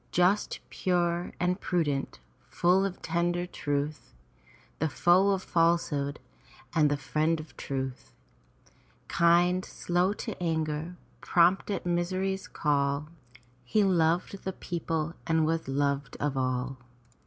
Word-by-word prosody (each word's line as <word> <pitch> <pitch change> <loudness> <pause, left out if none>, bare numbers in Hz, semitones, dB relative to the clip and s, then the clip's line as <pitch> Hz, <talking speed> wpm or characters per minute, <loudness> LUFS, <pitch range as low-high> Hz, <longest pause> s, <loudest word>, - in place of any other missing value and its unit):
Just, 180 +4 +2
pure, 175 -1 0
and 180 +2 0
prudent, 145 -6 -1 0.3
full 180 +8 +3
of 190 -2 -5
tender 175 +1 0 0.2
ruth, 145 - -2 0.6
The 160 - +1
foe 180 +7 +4
of 190 -1 +1
falsehood 165 -4 +1 0.5
and 155 -3 +4
the 145 - 0
friend 155 +3 0
of 155 0 -10
truth; 130 -1 -5 1.0
Kind, 175 +2 +3
slow 180 +3 0
to 220 0 -5
anger, 160 0 -1 0.2
prompt 175 +4 +3
at 200 - -2
misery's 185 +2 -1
call. 140 0 0 0.5
He 210 - +2
loved 180 +1 +1
the 190 - -3
people 165 -3 -3
and 160 -1 +3
was 165 -1 -1
loved 140 0 -1
of 145 -1 -1
all. 130 0 -1
170 Hz, 120 wpm, -29 LUFS, 145-180 Hz, 1.0 s, foe